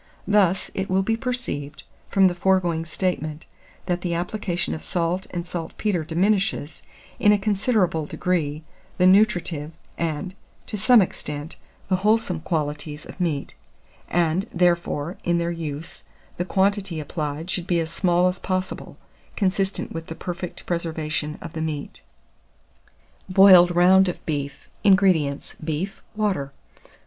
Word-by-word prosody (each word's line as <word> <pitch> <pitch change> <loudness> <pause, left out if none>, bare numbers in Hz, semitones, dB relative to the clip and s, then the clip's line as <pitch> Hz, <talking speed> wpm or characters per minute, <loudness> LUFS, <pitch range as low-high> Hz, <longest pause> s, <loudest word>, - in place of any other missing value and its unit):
Thus, 195 -3 +3
it 190 0 -3
will 190 +1 +2
be 225 +3 +1
perceived, 225 - -4 0.3
from 195 -1 +4
the 180 - +4
foregoing 175 -3 +1
statement, 160 -2 -2 0.4
that 180 -1 -1
the 175 -2 -1
application 175 0 -2
of 160 - -6
salt 175 +2 -1
and 175 -1 -4
saltpetre 175 +1 -2
diminishes, 190 0 0 0.4
in 210 - +5
a 210 - +5
considerable 195 -6 +1
degree, 155 -4 -1 0.3
the 180 - +4
nutritive, 180 -6 +3 0.3
and, 170 +3 -2 0.3
to - - -5
some 220 +1 +6
extent, 150 -2 -6 0.3
the 185 - +2
wholesome 210 -3 +1
qualities 150 -2 -3
of - - -11
meat; 155 -5 -1 0.6
and, 175 +2 +1
therefore, 170 -2 +1
in 175 0 +2
their 170 0 0
use, 160 -2 -5 0.3
the 175 - -1
quantity 195 -3 +1
applied 155 +2 -4
should 180 -1 -3
be 175 -2 +2
as 165 0 -2
small 180 -1 +2
as 180 0 -2
possible, 185 0 -3 0.4
consistent 195 -1 0
with 165 0 -6
the 160 - -6
perfect 175 0 -6
preservation 160 -3 -2
of 165 - -8
the 160 - -4
meat. 155 -3 -4 1.3
BOILED 185 -2 +7
ROUND 185 +2 +6
OF 175 - -7
BEEF. 140 -3 -4 0.2
608. 205 - +5
INGREDIENTS. 180 -8 +3
Beef, 160 +5 -3
water. 195 -10 -1
175 Hz, 135 wpm, -24 LUFS, 160-190 Hz, 1.3 s, BOILED